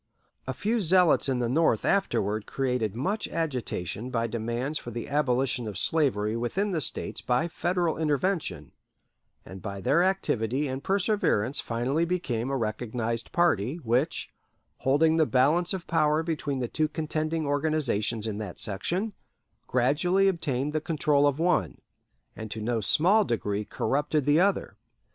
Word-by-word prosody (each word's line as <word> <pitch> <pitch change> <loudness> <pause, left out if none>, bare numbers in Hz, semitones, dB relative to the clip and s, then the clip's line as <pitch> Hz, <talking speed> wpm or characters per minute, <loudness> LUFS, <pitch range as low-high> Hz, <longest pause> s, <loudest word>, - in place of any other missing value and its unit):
A - - -2
few 225 +3 0
zealots 180 -5 +4
in 130 - +1
the 120 -1 0
North 130 -3 +2
afterward 110 - 0
created 125 -6 -1
much 195 - -2
agitation 125 - -3
by 115 -2 0
demands 120 +6 -3
for - - -8
the 120 0 -5
abolition 130 -4 0
of 105 -3 -5
slavery 115 - +1
within 175 - -1
the 165 -4 -1
States - - -3
by 125 +7 +1
Federal 175 -1 -1
intervention, 160 +4 -1 0.7
and 95 +1 -10
by 100 0 -5
their 145 - +2
activity 145 - 0
and 130 +1 -5
perseverance 190 - +1
finally 125 +7 -1
became 140 -9 -2
a 135 - 0
recognized 115 0 -3
party, 150 - +2
which, 130 -1 -1 0.5
holding 160 +4 +3
the 160 -2 +3
balance 155 +7 +2
of 185 -3 -3
power 155 -1 +2
between 150 -4 -2
the 125 -2 -2
two 155 +5 +1
contending 155 0 -2
organizations 140 -7 0
in 110 -2 -3
that 105 -5 -6
section, 175 - -1 0.5
gradually 155 +10 +2
obtained 150 -6 -1
the 155 - 0
control 150 -2 +2
of 140 -1 0
one, 175 +2 0 0.6
and 110 0 -7
to 110 - -5
no 115 +1 -1
small 185 - +4
degree 105 - -2
corrupted 145 +6 -1
the 145 +2 +4
other. 200 +2 +1
140 Hz, 150 wpm, -27 LUFS, 115-165 Hz, 0.7 s, zealots